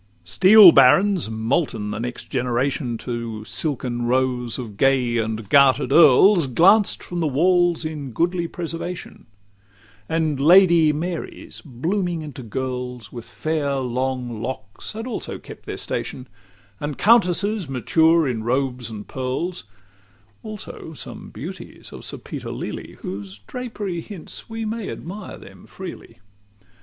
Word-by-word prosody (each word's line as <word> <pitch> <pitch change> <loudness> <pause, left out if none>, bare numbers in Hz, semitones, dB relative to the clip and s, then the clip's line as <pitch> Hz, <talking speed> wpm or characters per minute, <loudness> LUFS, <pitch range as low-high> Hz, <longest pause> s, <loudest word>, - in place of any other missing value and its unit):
LXVIII - - -12
Steel 195 0 +9
barons, 170 - +5
molten 110 -1 -1
the 105 - -4
next 120 +1 -6
generation 125 0 -1
To 115 -3 -5
silken 125 -5 -2
rows 125 -1 0
of 115 -6 -7
gay 125 0 +2
and 110 -1 -3
garter'd 135 0 +4
earls, 165 +3 +6
Glanced 190 - +4
from 175 - -5
the 165 - +1
walls 175 +3 +2
in 150 -3 -5
goodly 170 +6 0
preservation; 170 -1 -6 0.8
And 160 -3 0
Lady 170 0 +6
Marys 170 +3 -5
blooming 170 - -2
into 145 -3 -8
girls, 125 -1 -5
With 120 -2 -8
fair 155 -3 -2
long 125 -2 -2
locks, 115 - -6
had 225 +2 -6
also 255 - -5
kept - - -13
their - - -4
station; 130 0 -4 0.5
And 145 -1 -4
countesses 205 - +3
mature 160 +5 +3
in 115 -4 -2
robes 125 0 -1
and 105 -2 -8
pearls: 130 +7 -3 0.8
Also 210 -6 -8
some - - -7
beauties - - -9
of - - -9
Sir - - -5
Peter - - -7
Lely, - - -6
Whose 95 +1 -7
drapery 210 - -5
hints 195 +2 -10
we 225 0 -4
may 220 -1 -4
admire 195 +4 -7
them - - -15
freely. - - -10
140 Hz, 130 wpm, -22 LUFS, 125-175 Hz, 0.8 s, Steel